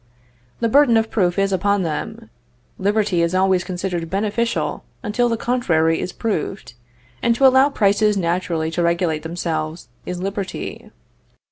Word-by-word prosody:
The 230 - +2
burden 250 -1 +5
of 225 0 0
proof 180 -4 +1
is 195 0 +1
upon 200 +1 +1
them. 150 -8 -5 0.5
Liberty 200 -2 +1
is 170 +2 0
always 185 -1 +3
considered 180 -2 -3
beneficial 215 +5 -1 0.2
until 240 +2 +1
the 230 - 0
contrary 165 -11 +1
is 180 - -3
proved, 200 - -3 0.5
and 235 - +2
to 270 - +3
allow 265 +2 +6
prices 210 -4 +2
naturally 170 -2 -1
to 175 - -1
regulate 170 -2 +1
themselves 160 -1 -4 0.2
is 180 0 -4
liberty. 195 +1 -5
190 Hz, 140 wpm, -20 LUFS, 170-220 Hz, 0.5 s, allow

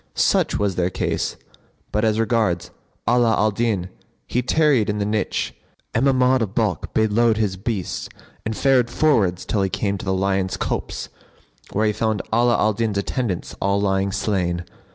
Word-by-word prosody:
Such - - +2
was 100 -3 -1
their 90 0 +1
case; - - -2 0.6
but 105 +1 0
as 110 -1 +2
regards 110 -6 +1 0.4
Ala 120 -1 +4
al 110 0 +2
Din, 100 -4 -1 0.4
he 125 - 0
tarried 130 -4 +3
in 105 - -1
the 100 - 0
niche, 105 -1 -1 0.4
and 115 +5 +2
Mahmud 130 -1 +3
of 105 -2 -3
Balkh 105 -9 0
bade 110 -1 +3
load 115 0 +3
his 105 -4 0
beasts 100 -1 -3 0.3
and 110 0 -3
fared 130 -4 +3
forwards 110 - +2
till 105 - 0
he 95 - +1
came 100 0 -1
to - - -7
the 95 - 0
Lion's 95 0 0
Copse - - -3 0.6
where 110 +2 +1
he 105 - +2
found 110 -2 -1
Ala 120 +1 +4
al 110 0 +2
Din's 110 -1 -1
attendants 100 -2 -2
all 100 +1 +2
lying 95 -1 +1
slain. 90 -4 -1
105 Hz, 175 wpm, -22 LUFS, 95-115 Hz, 0.6 s, Ala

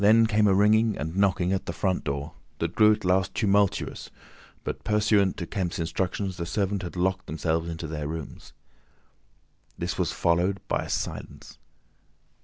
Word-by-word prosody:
Then 110 +2 +6
came 105 -1 +3
a 95 - +4
ringing 110 +2 +4
and 80 +3 -4
knocking 95 -2 +2
at 95 - -2
the - - -1
front 95 -2 -1
door, 70 -1 -3 0.2
that 85 +1 -2
grew 110 -1 +6
at 105 - -1
last 90 +1 +1
tumultuous, 100 -2 +1 0.5
but - - -5
pursuant 105 -2 +2
to 85 - -4
Kemp's 90 0 -3
instructions 95 +3 -2
the 85 - -3
servants 100 0 -1
had 90 - -6
locked 95 +1 0
themselves 80 +1 -1
into 80 0 -5
their 75 -2 -4
rooms. 80 -1 -7 1.3
This - - -3
was - - +1
followed 90 +3 +1
by - - -1
a - - -9
silence. - - -5
95 Hz, 165 wpm, -26 LUFS, 85-100 Hz, 1.3 s, Then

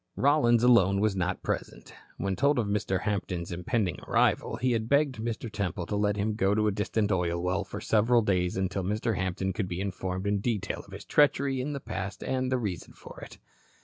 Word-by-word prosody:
Rollins 125 -5 +3
alone 100 -6 +5
was 105 -1 +1
not 95 0 -2
present. - - -4 0.2
When 95 -1 -1
told 140 +4 +2
of 120 - +1
Mr. 100 -2 -1
Hampton's 90 -5 -3
impending 90 +2 -1
arrival, - - +1
he 130 0 0
had 115 -1 -1
begged 140 -3 +2
Mr. 115 +1 -3
Temple 100 -5 -3
to 105 - -3
let 105 0 +1
him 105 +2 0
go 100 -1 +1
to 110 0 +2
a 105 - +3
distant 105 +1 -1
oil 85 -2 0
well 90 +3 0
for 100 - -7
several 115 +2 +3
days 90 -3 0
until 95 +1 -1
Mr. 105 +4 -1
Hampton 95 +1 -2
could 100 0 -2
be 90 0 -4
informed 95 -1 -3
in 100 0 +1
detail 110 -1 -2
of - - -16
his - - -9
treachery 140 -2 +2
in 145 +3 -3
the 140 - -4
past 95 -5 -5
and 130 0 -1
the 130 - +2
reason 100 -8 -4
for - - -12
it. - - -10
105 Hz, 210 wpm, -28 LUFS, 95-120 Hz, 0.2 s, alone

